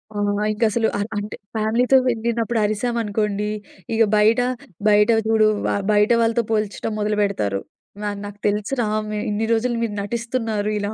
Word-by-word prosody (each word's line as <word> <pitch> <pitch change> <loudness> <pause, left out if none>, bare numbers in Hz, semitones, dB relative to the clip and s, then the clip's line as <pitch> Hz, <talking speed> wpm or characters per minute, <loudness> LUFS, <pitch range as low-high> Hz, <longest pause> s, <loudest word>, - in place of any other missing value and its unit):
ఆ! - - -4 0.4
ఇంకసలు 220 +1 +1
అ - - -2 0.2
అంటే 205 0 -4 0.2
ఫ్యామిలీ‌తో 230 +5 +3
వెళ్ళినప్పుడు 235 0 -1
అరిసాం 215 +3 -1
అనుకోండి. 210 -1 -1 0.5
ఇగా 225 0 +4
బయట 220 +3 +4 0.5
బయట 210 +1 +5 0.2
చూడు 220 -1 +4 0.2
వా - - +1 0.2
బయట 210 +2 +3
వాళ్ళతో 230 +1 +2
పోల్చడం 215 0 -1
మొదలు 210 0 0
పెడతారు. 105 - 0 0.4
వా 210 - -1 0.2
"నాకు 205 0 -9
తెలుసురా, 210 +4 0 0.2
మీ 210 - -3
ఇన్ని 210 +2 -1
రోజులు 240 +2 0
మీరు 215 -3 -2
నటిస్తున్నారు 225 -1 -2
ఇలా 205 0 -2
215 Hz, 150 wpm, -21 LUFS, 210-230 Hz, 0.5 s, బయట